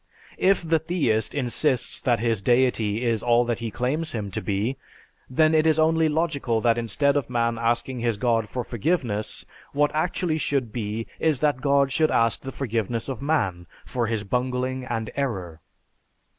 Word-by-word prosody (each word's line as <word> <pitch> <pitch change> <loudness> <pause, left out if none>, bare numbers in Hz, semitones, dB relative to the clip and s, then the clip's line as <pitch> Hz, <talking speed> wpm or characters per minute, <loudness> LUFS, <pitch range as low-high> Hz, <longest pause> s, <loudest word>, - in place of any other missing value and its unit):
If 185 -3 +3
the 160 0 +3
theist 145 - 0
insists 130 0 0
that 120 -4 +2
his 115 -3 0
deity 120 -1 +2
is 115 -2 +1
all 120 0 +3
that 120 -1 -1
he 115 -1 -3
claims 130 - -2
him 105 -4 -4
to - - -3
be, 105 +6 -1 0.5
then 155 +5 +3
it 155 0 +4
is 160 -1 +4
only 160 0 +3
logical 150 -7 0
that 115 0 +3
instead 140 +5 +1
of 140 -4 -1
man 115 -1 0
asking 120 +2 0
his 115 -2 0
god 115 -2 +1
for 125 - -3
forgiveness, 120 - -2 0.3
what 145 +1 +2
actually 160 0 0
should 135 -7 -1
be 110 -1 -3
is 155 -5 +1
that 145 -4 +1
God 140 0 +3
should 155 +3 +2
ask 115 -1 +2
the 135 - -6
forgiveness 115 -2 -2
of 135 -1 -5
man 100 - 0 0.2
for 120 -2 -1
his 110 -2 -1
bungling 125 +3 -2
and 115 -3 -3
error. 95 - -3
125 Hz, 170 wpm, -25 LUFS, 115-145 Hz, 0.5 s, it